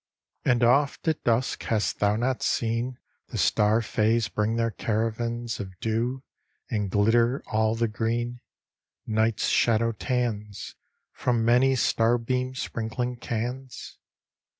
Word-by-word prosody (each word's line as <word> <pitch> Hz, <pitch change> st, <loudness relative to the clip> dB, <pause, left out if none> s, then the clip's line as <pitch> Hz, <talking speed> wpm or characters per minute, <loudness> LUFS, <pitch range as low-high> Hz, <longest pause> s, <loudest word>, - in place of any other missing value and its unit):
And 120 Hz, -1 st, +2 dB
oft 140 Hz, +6 st, +2 dB
at 160 Hz, -, 0 dB
dusk 120 Hz, +2 st, +1 dB
hast 110 Hz, -2 st, 0 dB
thou 105 Hz, 0 st, +3 dB
not 125 Hz, +3 st, -1 dB
seen 120 Hz, +2 st, -1 dB, 0.3 s
The -, -, -6 dB
star 110 Hz, +2 st, +3 dB
fays 110 Hz, -1 st, +1 dB
bring 105 Hz, +4 st, 0 dB
their 115 Hz, 0 st, 0 dB
caravans 115 Hz, +2 st, -2 dB
Of 95 Hz, -3 st, -7 dB
dew, 120 Hz, +4 st, -1 dB, 0.5 s
and 105 Hz, -4 st, -1 dB
glitter 115 Hz, +6 st, +2 dB
all 110 Hz, 0 st, +1 dB
the 115 Hz, 0 st, +1 dB
green, 120 Hz, +3 st, -2 dB, 0.6 s
Night's 110 Hz, 0 st, +1 dB
shadow 115 Hz, 0 st, +3 dB
tans, 105 Hz, -4 st, -3 dB, 0.4 s
From 120 Hz, -2 st, 0 dB
many 125 Hz, +3 st, +4 dB
starbeam 120 Hz, +2 st, +1 dB
sprinkling 120 Hz, +1 st, -3 dB
cans? 125 Hz, +3 st, -5 dB
115 Hz, 120 wpm, -26 LUFS, 110-125 Hz, 0.6 s, many